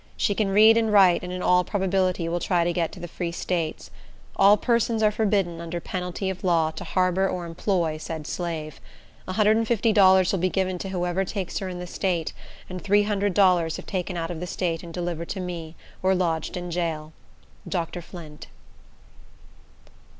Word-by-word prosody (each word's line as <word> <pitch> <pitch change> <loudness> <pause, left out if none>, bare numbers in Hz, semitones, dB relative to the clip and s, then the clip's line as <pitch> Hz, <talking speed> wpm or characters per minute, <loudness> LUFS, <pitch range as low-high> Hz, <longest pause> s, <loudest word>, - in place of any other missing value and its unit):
She 205 - +1
can 205 -1 0
read 215 +3 +6
and 225 -1 +1
write, 190 -4 +6
and 180 - -5
in 180 0 -4
all 180 0 +4
probability 185 -3 0
will 170 +1 -1
try 175 0 +1
to 175 0 0
get 170 -1 -1
to - - -10
the 175 - -6
Free 170 0 -4
States. 170 -2 -3 0.4
All 200 +2 +6
persons 235 -1 +1
are 210 - +5
forbidden, 195 -6 0
under 170 +1 -4
penalty 180 +2 -4
of 185 0 -9
law, 165 -3 +2
to - - -8
harbor 185 +1 +1
or 180 -1 -3
employ 170 -1 -1
said 160 -1 -6
slave. 160 -3 -5 0.5
$150 210 -2 +4
will 195 - 0
be 185 +2 +1
given 185 -1 -1
to 195 - -5
whoever 180 0 -1
takes 190 -1 -4
her 190 - -4
in 180 - -6
the 180 - -6
state, 175 -2 -2 0.3
and 185 -2 -7
$300 200 -4 +2
if - - -9
taken 180 -1 -3
out 165 0 -3
of 165 - -5
the 180 - -5
state 170 -3 -2
and 170 - -9
delivered 170 -1 -4
to 195 - -4
me, 170 -3 -6 0.3
or 190 0 +3
lodged 165 -2 -1
in 175 0 -5
jail. 160 -3 -3 0.6
Dr. 175 -1 -3
Flint. 160 -4 -11
180 Hz, 180 wpm, -25 LUFS, 170-195 Hz, 0.6 s, read